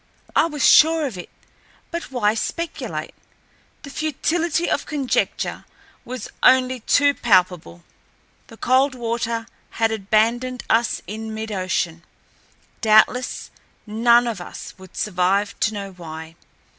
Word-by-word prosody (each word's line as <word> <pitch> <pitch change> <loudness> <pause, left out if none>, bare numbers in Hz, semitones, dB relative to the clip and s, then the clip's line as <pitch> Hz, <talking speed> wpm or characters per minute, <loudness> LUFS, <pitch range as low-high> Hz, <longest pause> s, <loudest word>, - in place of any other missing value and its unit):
I - - +4
was 295 -4 +1
sure 320 0 +6
of 255 -8 -4
it 180 - -8 0.6
but 340 -4 -5
why 215 -5 +2
speculate? 335 +9 -4 0.7
The 280 - -9
futility 320 +3 -1
of - - -1
conjecture 280 -4 -1 0.4
was 255 0 -6
only 255 0 +4
too 285 +5 +3
palpable. 180 - +1 0.6
The 225 - -14
Coldwater 235 -3 0 0.2
had 225 0 0
abandoned 225 +4 0
us 230 +1 +1
in 220 +3 -6
midocean. 185 -6 -2 0.8
Doubtless 220 +3 +3 0.3
none 235 +3 +4
of 235 -2 -3
us - - -9
would 190 -1 -14
survive 195 +1 +1
to 220 - +1
know 200 -1 -5
why. 160 -2 -9
230 Hz, 115 wpm, -22 LUFS, 200-260 Hz, 0.8 s, sure